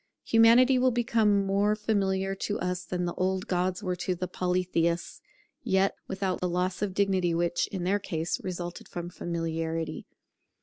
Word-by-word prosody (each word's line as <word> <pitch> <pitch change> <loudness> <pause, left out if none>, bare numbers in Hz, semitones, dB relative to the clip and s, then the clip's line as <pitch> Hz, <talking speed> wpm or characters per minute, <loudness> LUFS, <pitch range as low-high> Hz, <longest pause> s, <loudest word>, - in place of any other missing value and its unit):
Humanity 235 +3 +6
will 255 +1 +4
become 225 -4 +2
more 200 +2 +2
familiar 195 -3 0
to 205 +1 -3
us 180 0 -2
than 180 -1 -2
the 175 - -2
old 185 0 -1
gods 185 +2 -1
were 180 -2 -1
to 180 +1 -1
the 180 +1 -3
Polytheists, 180 -2 -1 0.4
yet 190 +1 +2
without 190 -1 -2
the 180 - 0
loss 180 +2 -1
of 195 -3 -2
dignity 190 -4 +2
which, 175 0 0
in 190 -3 -5
their 195 +3 +1
case, 165 -4 -3
resulted 175 -1 -5
from 175 0 -6
familiarity. 165 -1 -3
185 Hz, 160 wpm, -28 LUFS, 175-200 Hz, 0.4 s, Humanity